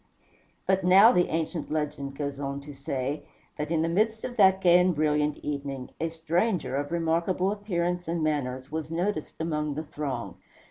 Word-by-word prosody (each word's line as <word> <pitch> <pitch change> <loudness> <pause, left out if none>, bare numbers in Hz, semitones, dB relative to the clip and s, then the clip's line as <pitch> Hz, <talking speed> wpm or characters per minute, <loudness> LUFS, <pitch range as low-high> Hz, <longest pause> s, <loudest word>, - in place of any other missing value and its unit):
But 190 0 +2
now, 195 +6 +8
the 180 -7 +3
ancient 160 +1 -3
legend 145 -3 -2
goes 140 -2 -3
on 140 0 -3
to 145 +1 -10
say, 135 +1 -3 0.4
that 150 - -2
in 160 -1 +1
the - - +1
midst 220 +6 +1
of 245 - -4
that 190 -2 +6
gay 180 -1 +6
and 180 -1 +3
brilliant 150 -1 +1
evening, 140 -3 -4
a 165 - 0
stranger 165 - 0
of 145 +2 -2
remarkable 170 +3 +1
appearance 180 -4 -2
and 165 -1 -1
manners 130 -3 -2
was 155 -1 -3
noticed 175 0 -2
among 150 -3 -1
the 155 - -3
throng. 150 -3 -5
160 Hz, 175 wpm, -27 LUFS, 145-180 Hz, 0.4 s, now